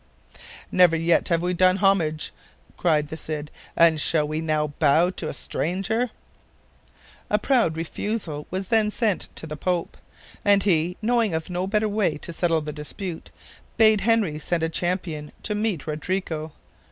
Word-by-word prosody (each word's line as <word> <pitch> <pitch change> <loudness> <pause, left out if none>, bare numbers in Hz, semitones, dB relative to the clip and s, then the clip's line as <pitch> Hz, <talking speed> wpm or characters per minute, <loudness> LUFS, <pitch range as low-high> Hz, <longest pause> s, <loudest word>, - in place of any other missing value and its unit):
"Never 180 -3 +5
yet 165 +1 +2
have 170 -1 +1
we 180 +1 0
done 185 +1 +4
homage," 180 -6 +1 0.4
cried 150 -4 +1
the 160 - -6
Cid, 155 -2 -5 0.3
"and 165 -2 +5
shall 150 -2 +2
we 155 +1 -2
now 155 -2 0
bow 160 +4 +4
to 160 -4 -4
a - - -2
stranger?" 195 +8 -1 1.2
A 210 - +3
proud 215 - +2
refusal 165 -2 -3
was 190 +1 -4
then 220 -2 +3
sent 210 -2 -1
to - - -4
the 155 -1 -6
Pope, 175 +2 -2 0.5
and 200 -1 +4
he, 175 -2 +1
knowing 230 -5 +2
of 160 +3 -4
no 180 +1 -1
better 210 +2 +1
way 205 -7 0
to 170 - -7
settle 165 -1 +1
the 150 0 -5
dispute, 160 +4 -6 0.5
bade 220 -2 +5
Henry 210 -9 +2
send 165 +1 -1
a 165 - +1
champion 165 -3 -3
to 210 - -1
meet 210 -7 -1
Rodrigo. 160 0 -3
175 Hz, 160 wpm, -24 LUFS, 155-200 Hz, 1.2 s, Never